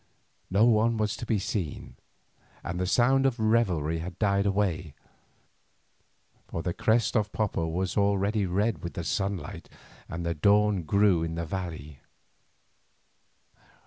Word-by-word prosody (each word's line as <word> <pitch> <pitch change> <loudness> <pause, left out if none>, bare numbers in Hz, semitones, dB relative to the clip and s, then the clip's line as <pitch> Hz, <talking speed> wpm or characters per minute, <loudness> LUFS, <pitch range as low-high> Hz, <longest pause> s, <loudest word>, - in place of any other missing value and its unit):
No 100 +4 +4
one 115 0 +3
was 105 -1 0
to 120 - -7
be 110 - +2
seen, 95 -5 -4 0.7
and 90 - -4
the 90 - -1
sound 135 +6 +3
of 125 -3 -2
revelry 95 -9 +1
had 90 +2 -7
died 100 -1 +1
away, 95 -6 -1 1.5
for 85 - -5
the 90 -2 -2
crest 115 +5 +1
of 105 -2 +1
Popo 100 -6 -1
was 90 +3 -2
already 100 0 +1
red 100 0 0
with 85 - -6
the 85 - -3
sunlight 95 +3 -3 0.4
and 85 +1 -5
the 85 - 0
dawn 100 +3 +3
grew 100 0 +3
in 80 0 -3
the 85 0 -3
valley. 80 -5 -6
100 Hz, 140 wpm, -27 LUFS, 85-105 Hz, 1.5 s, No